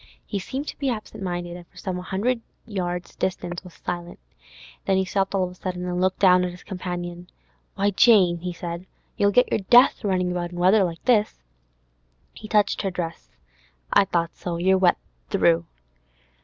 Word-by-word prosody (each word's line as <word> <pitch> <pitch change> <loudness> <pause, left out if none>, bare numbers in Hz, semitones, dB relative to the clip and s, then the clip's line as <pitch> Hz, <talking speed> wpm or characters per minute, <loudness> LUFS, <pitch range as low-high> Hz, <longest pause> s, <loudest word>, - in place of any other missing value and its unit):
He 200 - -3
seemed 270 +9 -5
to - - -9
be 275 -2 0
absent 215 -3 -5
minded, 175 -2 -3
and 175 -1 -11
for - - -23
some 185 -2 -4
hundred 215 +7 -1 0.2
yards' 180 -5 -4
distance 175 -1 -3
was 180 -2 -13
silent; 175 -1 -5 0.7
then 195 - +2
he 190 - +1
stopped 195 +1 -1
of 185 -2 0
a - - -11
sudden 180 0 -5
and 180 0 -2
looked 185 0 +1
down 180 -2 +5
at 180 - -1
his 180 0 -11
companion. 175 -2 -6 0.5
'Why, 200 +1 +1
Jane,' 190 -5 +5
he 180 +1 -4
said, 170 +1 -6 0.3
'you'll 200 -2 +3
get 250 +5 +3
your - - +2
death, 245 +3 +6
running 185 -3 +1
about 175 0 -3
in - - -7
weather 190 +4 +5
like 170 -2 -4
this.' 215 - +2 0.9
He 215 - -10
touched 210 -1 +2
her 195 - -1
dress. 175 -2 -5 0.6
'I - - +6
thought 170 -2 -1
so; 175 -2 -4
you're 190 +3 +3
wet 180 -2 +4 0.3
through. 85 -2 +3
180 Hz, 185 wpm, -24 LUFS, 175-200 Hz, 0.9 s, death